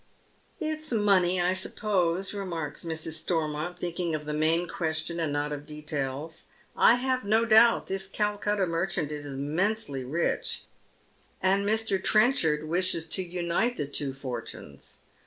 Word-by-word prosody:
" - - -36
It's 310 -2 -3
money 195 -5 +3
I 175 +1 +2
suppose," 185 -1 0
remarks 170 -7 -3
Mrs. 160 -1 0
Stormont, 160 0 -2
thinking 175 -1 -2
of 150 -1 -5
the 150 - -3
main 160 +3 +2
question 160 0 -3
and 160 -3 0
not 145 +1 -1
of 145 0 -6
details. 150 0 -4
" - - -32
I 235 - +6
have 255 0 0
no 220 +3 +3
doubt 230 +1 +6
this 195 0 -3
Calcutta 205 -1 0
merchant 165 -3 -1
is 145 -1 -5
immensely 145 +2 -1
rich, 155 +7 -1 0.8
and 195 +2 +2
Mr. 220 -4 0
Trenchard 170 - +3
wishes 170 0 0
to 190 - +3
unite 180 +6 -1
the 145 - -1
two 140 0 -2
fortunes. 125 - -7
170 Hz, 145 wpm, -28 LUFS, 150-200 Hz, 0.8 s, I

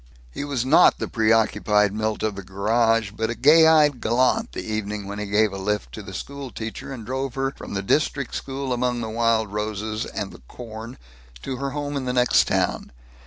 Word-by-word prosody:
He 140 - -5
was 140 -4 -2
not 155 +6 +6
the - - -3
preoccupied 110 -2 +2
Milt 110 0 -2
of 110 -1 0
the 100 - -6
garage 110 +3 +1
but 110 +1 -2
a 120 - -2
gay 160 +7 +6
eyed 150 -5 +4
gallant, 130 - +1
the - - -5
evening 105 -1 -3
when 100 +1 -6
he 105 - -4
gave 105 0 +2
a 100 - -5
lift 100 -9 -2
to - - -7
the - - -10
school 140 -1 -6
teacher 115 +3 -7
and 120 -5 -7
drove 130 +1 -3
her 135 0 -1
from - - -8
the 100 - -2
district 140 +3 0
school 135 -1 -3
among 125 0 -1
the 110 - -4
wild 115 -2 +1
roses 105 +1 -3
and 105 -3 -5
the - - -14
corn 115 +1 -9 0.5
to 130 - -4
her 140 +2 -2
home 145 +1 -4
in 135 -2 -2
the 125 - -1
next 125 -1 +4
town. - - -1
115 Hz, 210 wpm, -23 LUFS, 105-135 Hz, 0.5 s, not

